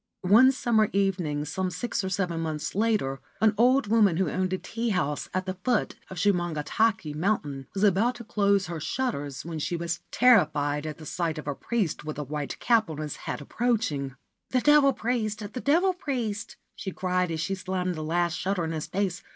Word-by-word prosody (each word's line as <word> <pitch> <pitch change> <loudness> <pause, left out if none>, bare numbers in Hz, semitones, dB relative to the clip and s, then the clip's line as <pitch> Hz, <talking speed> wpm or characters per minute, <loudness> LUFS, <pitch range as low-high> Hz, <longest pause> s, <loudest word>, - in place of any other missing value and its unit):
One 230 +8 +7
summer 230 -5 +2
evening, 180 -7 0
some 185 +5 -2
six 205 +4 -3
or 190 - -2
seven 180 -3 -1
months 155 -2 -3
later, 205 -11 +1 0.2
an 220 -1 +4
old 250 +4 +4
woman 205 -5 +4
who 185 -4 +1
owned 185 0 -1
a 185 - 0
tea 230 +4 -3
house 150 -8 -1
at 185 0 -2
the 185 - -2
foot 245 -4 +1 0.2
of 190 - -8
Shumongatake 175 0 +1
Mountain 150 -6 -1
was 195 - 0
about 210 +5 +3
to 240 - -8
close 200 -3 +2
her 170 -2 -5
shutters 150 - -3
when 165 -2 -4
she 170 - -2
was 170 0 -2
terrified 150 -11 +3
at 155 - -5
the 155 - -11
sight 165 0 -2
of 155 - -7
a 145 - 0
priest 205 - -2
with 155 -1 -5
a 150 - -2
white 145 0 -4
cap 230 -6 +2
on 155 - -5
his 150 -1 -4
head - - -3
approaching. 150 - -1 0.2
' - - -56
The 255 - +1
Devil 295 -1 +6
Priest! 220 -3 -1 0.2
The 250 - -4
Devil 350 +7 +3
Priest! 245 - -3
* - - -50
she 195 - -5
cried 180 -1 0
as 160 -1 -3
she 165 +5 -1
slammed 185 -1 -2
the 155 - -5
last 170 +2 0
shutter 185 +1 -1
in 160 - -2
his 155 -2 -3
face. 190 -2 -1
185 Hz, 205 wpm, -27 LUFS, 155-220 Hz, 0.2 s, One